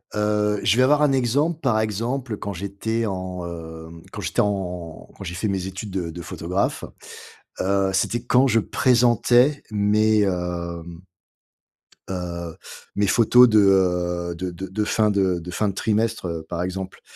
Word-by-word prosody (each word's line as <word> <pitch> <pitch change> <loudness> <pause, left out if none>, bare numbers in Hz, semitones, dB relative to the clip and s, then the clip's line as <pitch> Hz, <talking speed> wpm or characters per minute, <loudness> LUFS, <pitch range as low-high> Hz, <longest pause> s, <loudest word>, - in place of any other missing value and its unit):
heu, 105 0 +1
je 110 - +3
vais 130 - +5
avoir 150 +3 +4
un 145 -2 +4
exemple. 140 +6 +1
Par 120 -5 +2
exemple 115 +2 -2
quand 100 -1 -5
j'étais 100 +5 -3
en, 90 -2 -4
hem, 80 -1 -9
quand - - -6
j'étais - - 0
en 90 -5 -4
quand - - -8
j'ai 85 - -5
fait 90 +5 -2
mes 95 -2 -2
études 95 +2 -6
de 90 -3 -3
de 85 +1 -8
photographe, 90 +4 -2 0.8
heu, 95 0 +1
c'était 115 +5 0
quand 125 +2 +4
je 115 -2 +3
présentais 125 +4 +3
mes, 105 +1 +3
hem 85 -2 -3 1.1
heu, 85 -2 -5 0.4
mes 100 0 +1
photos 120 +3 +6
de, 110 -1 +5
heu, 90 -3 +2
de 90 +1 -4
de 95 +2 -7
de 105 +3 -1
fin 105 -1 +2
de 95 -3 +1
de 90 +2 -8
fin 105 +4 0
de 100 - -1
trimestre, 110 +1 -1
heu, 80 -1 -4
par 85 0 -3
exemple. 95 +1 -5
100 Hz, 165 wpm, -23 LUFS, 90-110 Hz, 1.1 s, photos